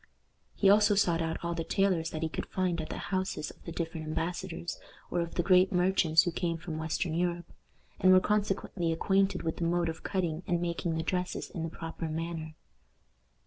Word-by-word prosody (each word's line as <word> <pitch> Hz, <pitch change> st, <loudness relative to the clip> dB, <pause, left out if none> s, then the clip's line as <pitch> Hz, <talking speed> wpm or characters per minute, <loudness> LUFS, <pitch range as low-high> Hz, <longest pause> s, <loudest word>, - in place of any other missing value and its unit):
He 200 Hz, -, +3 dB
also 210 Hz, +1 st, +6 dB
sought 170 Hz, -4 st, +3 dB
out 165 Hz, 0 st, -1 dB
all 170 Hz, -, 0 dB
the 165 Hz, -1 st, -2 dB
tailors 180 Hz, -3 st, +1 dB
that 155 Hz, 0 st, -4 dB
he -, -, +2 dB
could -, -, -4 dB
find 180 Hz, -3 st, 0 dB
at 155 Hz, -, -6 dB
the -, -, -4 dB, 0.2 s
houses 185 Hz, -5 st, -1 dB
of -, -, -21 dB
the 170 Hz, -, -5 dB
different 165 Hz, -1 st, -4 dB
embassadors, 170 Hz, +1 st, -3 dB, 0.3 s
or 175 Hz, -, +1 dB
of 170 Hz, 0 st, -4 dB
the 175 Hz, -, +1 dB
great 185 Hz, +1 st, +5 dB
merchants 180 Hz, -3 st, +4 dB
who 175 Hz, -, -1 dB
came 170 Hz, 0 st, -1 dB
from 160 Hz, -1 st, -5 dB
western 160 Hz, +1 st, -1 dB
Europe, 175 Hz, 0 st, -1 dB, 0.5 s
and 185 Hz, -, +6 dB
were 185 Hz, -, +8 dB
consequently 195 Hz, -4 st, 0 dB
acquainted 195 Hz, +4 st, +1 dB
with 160 Hz, -1 st, -2 dB
the -, -, -2 dB
mode 170 Hz, 0 st, +1 dB
of 160 Hz, -, -6 dB
cutting 175 Hz, -4 st, -1 dB
and 175 Hz, -1 st, +1 dB
making 170 Hz, -1 st, -1 dB
the 160 Hz, -, -1 dB
dresses 180 Hz, +1 st, -2 dB
in 170 Hz, -, -5 dB
the 165 Hz, -, -2 dB
proper 165 Hz, 0 st, -5 dB
manner. 160 Hz, 0 st, -4 dB
170 Hz, 200 wpm, -30 LUFS, 165-185 Hz, 0.5 s, were